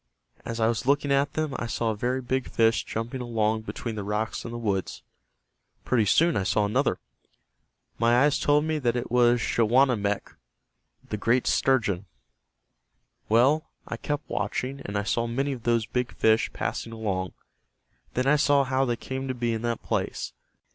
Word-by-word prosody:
As 115 0 -4
I 110 - +3
was 115 +1 -1
looking 140 0 +2
at 140 +1 +2
them 155 -3 -2
I 120 - -3
saw 115 0 -1
a - - -3
very 125 +5 -1
big 130 +1 -1
fish 115 0 +2
jumping 115 +3 -4
along 110 -2 0
between 115 +1 -5
the 105 -2 -4
rocks 105 +2 -2
and 115 - -6
the 120 - -5
woods. 100 -6 -2 0.8
Pretty 115 -4 +2
soon 165 - +3
I - - +1
saw 105 +2 +1
another. 100 - +1 1.0
My 120 +3 +4
eyes 145 -1 +3
told 150 +1 +3
me 155 -1 -1
that 120 -4 0
it 120 - -3
was 120 0 +4
Schawanammek, 115 -3 +2 0.8
the 105 - -3
great 115 +4 +2
sturgeon. 105 -8 +1 1.2
Well, 130 +8 +3 0.2
I - - -4
kept 145 +5 -4
watching 135 +2 -3
and 100 0 -3
I 100 - 0
saw 115 +3 0
many 135 +4 -1
of 125 -4 -7
those 115 -2 +2
big 125 +2 -2
fish 110 0 +3
passing 115 - -4
along. 95 -5 -3 0.8
Then 125 - +1
I 145 +2 +4
saw 145 -1 +4
how 130 0 +1
they 120 -2 0
came 130 +3 -5
to 130 - -2
be 120 -1 -1
in 110 - -3
that 120 -1 -2
place. - - -2
120 Hz, 175 wpm, -26 LUFS, 110-130 Hz, 1.2 s, My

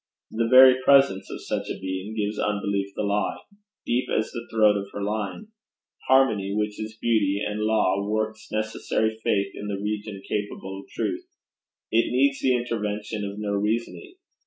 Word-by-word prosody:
The 115 +1 0
very 130 0 +8
presence 135 -8 +4
of - - -7
such - - -3
a - - -3
being 95 +3 -4
gives 105 -1 -2
Unbelief 100 -1 -1
the - - -2
lie, 100 -1 0 0.5
deep 125 +2 0
as 110 - 0
the 120 -2 -7
throat 110 -2 +4
of 100 -1 -3
her 100 - -4
lying. 105 - -3 0.6
Harmony, 110 -7 +3
which 105 0 -2
is 110 +1 -6
beauty 105 -4 +1
and 105 0 -4
law, 105 -3 +2
works 110 0 -2
necessary 110 0 -1
faith 100 -1 +1
in 105 - -7
the 100 -1 -2
region 105 0 -4
capable 95 -2 -4
of - - -14
truth. - - -3 0.6
It 115 +1 +2
needs 135 +2 +2
the 130 -1 +2
intervention 105 -3 -3
of 100 0 -5
no 105 -1 -3
reasoning. 115 - -2
105 Hz, 165 wpm, -25 LUFS, 100-115 Hz, 0.6 s, very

